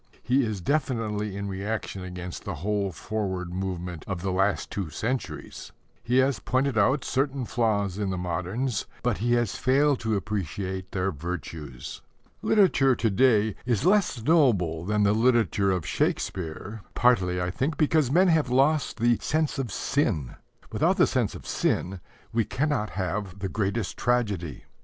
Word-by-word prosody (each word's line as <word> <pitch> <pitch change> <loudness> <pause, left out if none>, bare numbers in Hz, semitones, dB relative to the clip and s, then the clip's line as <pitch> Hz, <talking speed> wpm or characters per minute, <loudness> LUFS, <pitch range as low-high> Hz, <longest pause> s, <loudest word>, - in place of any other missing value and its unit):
He 130 +2 +3
is 110 -5 -3
definitely 110 - -1
in 100 0 -3
reaction 100 0 -4
against 90 -1 -7
the - - -4
whole 100 -2 0
forward 95 -2 -3
movement 90 -3 -4
of 95 -3 -4
the 95 - 0
last 95 0 0
two 95 -6 -3
centuries. 115 +11 -4 0.3
He 125 +1 +1
has 130 -1 +3
pointed 130 0 0
out 125 +6 +3
certain 135 -1 0
flaws 105 -5 0
in 100 -2 -1
the 95 - -2
moderns, 95 +8 -2 0.2
but 125 -4 0
he 120 +2 +1
has 120 -4 +1
failed 140 +1 +3
to 110 -2 0
appreciate 95 -1 -3
their 95 0 0
virtues. 80 -5 -6 0.4
Literature 140 - +4
to 115 -2 0
day 110 -2 +3
is 125 +2 0
less 185 - +3
noble 105 - +3
than 105 +1 +1
the 100 0 +4
literature 115 -3 +3
of 90 -4 0
Shakespeare, 95 +7 -2
partly, 95 -7 +3
I 90 0 -1
think, 135 - -1
because 155 -3 +3
men 180 +6 +4
have 160 -5 +3
lost 140 +3 +2
the 120 0 +3
"sense 155 -2 0
of 125 -6 -2
sin." 90 - 0 0.4
Without - - +2
the - - +6
sense - - 0
of - - -10
sin 95 +1 -1 0.3
we 115 0 +3
cannot 135 -4 -1
have 95 0 -3
the 100 -1 -3
greatest 100 +1 -2
tragedy. 105 - -1
105 Hz, 155 wpm, -26 LUFS, 95-130 Hz, 0.4 s, the